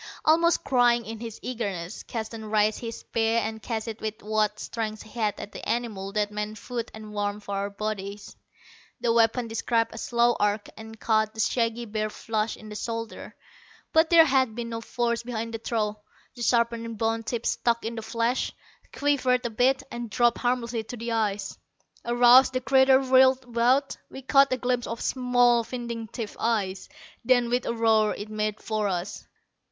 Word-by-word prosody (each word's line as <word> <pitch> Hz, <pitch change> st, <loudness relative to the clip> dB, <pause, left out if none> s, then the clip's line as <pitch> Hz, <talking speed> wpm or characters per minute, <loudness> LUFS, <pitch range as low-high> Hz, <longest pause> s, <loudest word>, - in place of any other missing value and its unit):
Almost 335 Hz, +2 st, +4 dB
crying 240 Hz, -2 st, +3 dB
in 225 Hz, 0 st, -7 dB
his 230 Hz, -1 st, -7 dB
eagerness, 200 Hz, -8 st, -4 dB
Keston 220 Hz, -1 st, -6 dB
raised 215 Hz, 0 st, +2 dB
his 230 Hz, -1 st, -6 dB
spear 225 Hz, 0 st, 0 dB
and 220 Hz, 0 st, -2 dB
cast 225 Hz, -1 st, -4 dB
it 225 Hz, 0 st, -6 dB
with 215 Hz, 0 st, -5 dB
what 215 Hz, 0 st, 0 dB
strength 215 Hz, -2 st, -4 dB
he 220 Hz, -, -16 dB
had 210 Hz, -2 st, 0 dB
at 205 Hz, -, -7 dB
the -, -, -7 dB
animal 215 Hz, -5 st, -2 dB
that 210 Hz, 0 st, 0 dB
meant 210 Hz, +1 st, -4 dB
food 235 Hz, +1 st, -5 dB
and 215 Hz, -1 st, -10 dB
warmth 205 Hz, 0 st, -2 dB
for 200 Hz, -, -5 dB
our 200 Hz, +1 st, -2 dB
bodies. 200 Hz, -1 st, -5 dB, 0.6 s
The 235 Hz, -1 st, +1 dB
weapon 230 Hz, +1 st, +3 dB
described 230 Hz, 0 st, 0 dB
a 225 Hz, -, -7 dB
slow 240 Hz, 0 st, +2 dB
arc, 205 Hz, 0 st, 0 dB
and 220 Hz, 0 st, -11 dB
caught 215 Hz, -1 st, +1 dB
the -, -, -10 dB
shaggy 230 Hz, 0 st, 0 dB
bear 215 Hz, 0 st, -2 dB
flush 220 Hz, 0 st, -2 dB
in 215 Hz, -, -12 dB
the 210 Hz, -, -8 dB
shoulder. 230 Hz, +1 st, -5 dB, 0.6 s
But 320 Hz, 0 st, +5 dB
there 330 Hz, -2 st, +8 dB
had 260 Hz, -6 st, +2 dB
been 235 Hz, -1 st, -4 dB
no 230 Hz, 0 st, -4 dB
force 235 Hz, 0 st, -1 dB
behind 230 Hz, -1 st, -4 dB
the 225 Hz, -, -3 dB
throw. 215 Hz, -2 st, -2 dB, 0.4 s
The 240 Hz, -, -10 dB
sharpened 235 Hz, -1 st, +1 dB
bone 225 Hz, +1 st, 0 dB
tip 230 Hz, +1 st, -4 dB
stuck 235 Hz, -1 st, 0 dB
in 230 Hz, -, -3 dB
the 225 Hz, -, -5 dB
flesh, 230 Hz, +3 st, -1 dB, 0.4 s
quivered 260 Hz, -3 st, +1 dB
a 240 Hz, -, -1 dB
bit, 250 Hz, +4 st, +2 dB
and 240 Hz, -1 st, -5 dB
dropped 240 Hz, +1 st, +2 dB
harmlessly 240 Hz, -2 st, -1 dB
to 245 Hz, -, -7 dB
the 235 Hz, +1 st, -4 dB
ice. 210 Hz, -3 st, -1 dB, 0.5 s
Aroused, 245 Hz, +2 st, +6 dB
the 255 Hz, -, -1 dB
creature 265 Hz, 0 st, +5 dB
whirled 260 Hz, 0 st, +5 dB
about. 245 Hz, +3 st, +1 dB
We 265 Hz, -, -9 dB
caught 275 Hz, +1 st, +5 dB
a 255 Hz, -, +1 dB
glimpse 245 Hz, -1 st, -1 dB
of 230 Hz, +1 st, -5 dB
small, 245 Hz, -2 st, +3 dB
vindictive 230 Hz, -2 st, -6 dB
eyes. 200 Hz, -4 st, -1 dB, 0.3 s
Then, 245 Hz, -1 st, +3 dB
with 245 Hz, 0 st, 0 dB
a -, -, 0 dB
roar, 220 Hz, -2 st, +3 dB
it 205 Hz, +1 st, -7 dB
made 215 Hz, 0 st, -2 dB
for 215 Hz, -1 st, -1 dB
us. 180 Hz, -2 st, -4 dB
230 Hz, 180 wpm, -26 LUFS, 215-245 Hz, 0.6 s, there